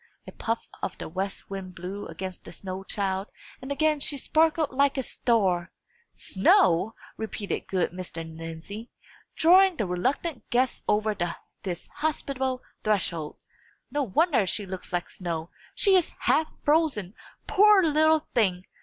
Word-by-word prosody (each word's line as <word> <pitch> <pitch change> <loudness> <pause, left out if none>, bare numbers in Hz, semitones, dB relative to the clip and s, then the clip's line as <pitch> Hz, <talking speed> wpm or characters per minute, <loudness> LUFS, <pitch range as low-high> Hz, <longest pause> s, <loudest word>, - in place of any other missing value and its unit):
A - - -9
puff 230 0 -3
of - - -3
the - - -6
west 190 +4 -4
wind 190 -2 -6
blew 185 +3 -6
against 185 +3 -7
the - - -9
snow 190 0 -6
child, 195 0 -2 0.3
and 265 - -6
again 305 +1 +2
she 285 0 +1
sparkled 315 +1 +2
like 280 +1 +2
a 265 - 0
star. 190 -9 +1 0.4
"Snow!" 190 +1 +3 0.2
repeated 220 -2 -4
good 185 -2 0
Mr. 175 -2 -6
Lindsey, 165 +7 -8 0.5
drawing 370 +3 +6
the 215 - 0
reluctant 250 - -2
guest 250 +1 +1
over 210 0 +2 0.5
this 175 -3 -5
hospitable 265 -4 -1 0.2
threshold. 175 -7 0 0.5
"No 290 +2 0
wonder 275 - +2
she 205 +3 0
looks 190 -1 -6
like 175 -1 -2
snow. 170 -2 -4 0.2
She 395 -3 +5
is 360 -3 +2
half 315 - +3 0.2
frozen, 290 - +2 0.3
poor 415 -1 +6
little 315 0 +3
thing! 190 -6 +2
215 Hz, 140 wpm, -27 LUFS, 185-290 Hz, 0.5 s, drawing